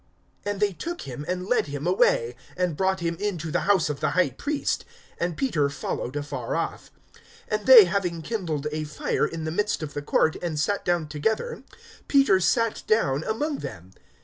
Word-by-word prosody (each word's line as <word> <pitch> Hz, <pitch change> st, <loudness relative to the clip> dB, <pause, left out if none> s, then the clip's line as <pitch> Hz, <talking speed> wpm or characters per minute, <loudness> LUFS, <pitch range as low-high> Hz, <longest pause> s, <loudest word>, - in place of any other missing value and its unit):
(54)And 205 Hz, 0 st, -1 dB
they 205 Hz, -1 st, +2 dB
took 340 Hz, -, -5 dB
him, 135 Hz, +2 st, -6 dB
and 180 Hz, 0 st, -2 dB
led 245 Hz, -5 st, +1 dB
him 145 Hz, +1 st, -5 dB
away, 125 Hz, -9 st, +2 dB, 0.2 s
and 180 Hz, -3 st, 0 dB
brought 190 Hz, +1 st, 0 dB
him 170 Hz, 0 st, -1 dB
into 175 Hz, -6 st, -2 dB
the 180 Hz, +4 st, -1 dB
house 185 Hz, -5 st, +4 dB
of 150 Hz, -2 st, -3 dB
the -, -, +1 dB
high 180 Hz, -7 st, +3 dB
priest. 285 Hz, -, -2 dB, 0.4 s
And 170 Hz, -1 st, -1 dB
Peter 155 Hz, -, +1 dB
followed 140 Hz, -2 st, -4 dB
afar 145 Hz, -4 st, -3 dB
off. 165 Hz, -, -3 dB, 0.6 s
(55)And -, -, -1 dB
they -, -, +11 dB
having 180 Hz, -, -1 dB
kindled 165 Hz, -7 st, -3 dB
a 155 Hz, 0 st, -2 dB
fire 150 Hz, 0 st, -1 dB
in 165 Hz, -1 st, -6 dB
the 155 Hz, -, -2 dB
midst 210 Hz, -1 st, -1 dB
of 145 Hz, -1 st, -6 dB
the 145 Hz, -, -3 dB
court, 155 Hz, +2 st, +2 dB
and 160 Hz, -4 st, -2 dB
sat 200 Hz, +7 st, 0 dB
down 175 Hz, -3 st, 0 dB
together, 220 Hz, -, -2 dB, 0.5 s
Peter 275 Hz, -9 st, +5 dB
sat 230 Hz, +4 st, +1 dB
down 150 Hz, -10 st, +2 dB
among 290 Hz, +7 st, -1 dB
them. 90 Hz, +1 st, -8 dB
170 Hz, 185 wpm, -25 LUFS, 150-205 Hz, 0.6 s, they